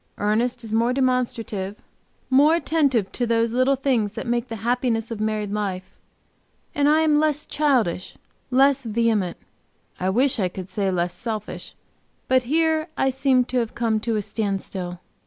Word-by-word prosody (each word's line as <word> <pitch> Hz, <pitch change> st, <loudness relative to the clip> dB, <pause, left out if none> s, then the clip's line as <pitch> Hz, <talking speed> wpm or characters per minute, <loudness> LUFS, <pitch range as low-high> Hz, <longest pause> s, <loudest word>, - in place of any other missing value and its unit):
Ernest 235 Hz, +4 st, 0 dB
is 220 Hz, -1 st, -6 dB
more 230 Hz, +2 st, +2 dB
demonstrative, 235 Hz, -6 st, -1 dB, 0.6 s
more 290 Hz, +5 st, +6 dB
attentive 280 Hz, -, +1 dB
to 245 Hz, -, -1 dB
those 230 Hz, 0 st, +1 dB
little 255 Hz, +2 st, +3 dB
things 250 Hz, -6 st, 0 dB
that -, -, -5 dB
make 240 Hz, 0 st, -1 dB
the 225 Hz, -, -5 dB
happiness 240 Hz, -2 st, 0 dB
of 225 Hz, -, -4 dB
married 215 Hz, -1 st, -1 dB
life, 190 Hz, -3 st, -4 dB, 0.7 s
and 290 Hz, 0 st, +2 dB
I 310 Hz, +1 st, +4 dB
am 305 Hz, -2 st, +3 dB
less 300 Hz, -1 st, +1 dB
childish, 245 Hz, -, 0 dB, 0.3 s
less 275 Hz, +1 st, +4 dB
vehement 220 Hz, -5 st, 0 dB, 0.6 s
I 185 Hz, -, 0 dB
wish 250 Hz, +5 st, +2 dB
I 190 Hz, -, +2 dB
could 185 Hz, +1 st, -8 dB
say 200 Hz, -3 st, 0 dB
less 175 Hz, -1 st, -1 dB
selfish, 215 Hz, -3 st, -5 dB, 0.5 s
but 260 Hz, 0 st, +4 dB
here 320 Hz, 0 st, +2 dB
I 265 Hz, -, +2 dB
seem 260 Hz, -1 st, +2 dB
to 255 Hz, -, -3 dB
have 230 Hz, -2 st, -3 dB
come 225 Hz, -2 st, +1 dB
to 225 Hz, +1 st, -1 dB
a 210 Hz, -, -1 dB
standstill. 195 Hz, -4 st, -3 dB
235 Hz, 160 wpm, -23 LUFS, 210-265 Hz, 0.7 s, more